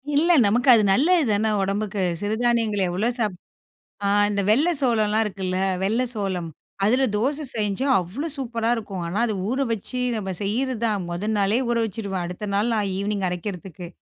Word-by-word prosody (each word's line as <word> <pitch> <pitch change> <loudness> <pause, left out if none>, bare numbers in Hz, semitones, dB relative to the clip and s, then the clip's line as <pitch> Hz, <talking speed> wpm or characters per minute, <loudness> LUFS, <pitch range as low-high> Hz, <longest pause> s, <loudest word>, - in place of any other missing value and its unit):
இல்ல. 330 +4 +3 0.2
நமக்கு 245 +6 +2
அது 220 -2 +5
நல்லது 320 - +3
தானே! 215 +2 +1
உடம்புக்கு. 200 0 -1 0.2
சிறுதானியங்கள் 220 -1 +1
எவ்வள 190 +6 -1
சாப் 210 -5 0 0.7
ஆ - - +2 0.2
இந்த 200 -1 0
வெள்ள 280 +11 +4
சோளம்லாம் 220 -4 +2
இருக்குல்ல. 190 -3 -3 0.3
வெள்ள 220 +6 +1
சோளம். 190 -5 -3 0.4
அதில 255 +6 +3
தோச 275 +8 0
செஞ்சா, 210 +4 -1
அவ்ளோ 225 - -5
சூப்பரா 230 -4 -2
இருக்கும். 195 -5 -5
ஆனா 180 +5 -3
அத 220 - -1 0.2
ஊறவச்சி, 250 -1 -2 0.2
நம்ம 195 -3 -4
செய்யிறதான். 225 -1 -1
முத 195 +5 -3
நாளே 205 +4 +2
ஊறவச்சிருவேன். 210 -5 -2
அடுத்த 180 +4 -6
நாள் 215 +4 +1
நான் 200 -3 -1
ஈவ்னிங் 200 -1 -1
அரைக்கிறதுக்கு. 180 -1 -6
215 Hz, 150 wpm, -23 LUFS, 195-235 Hz, 0.7 s, அது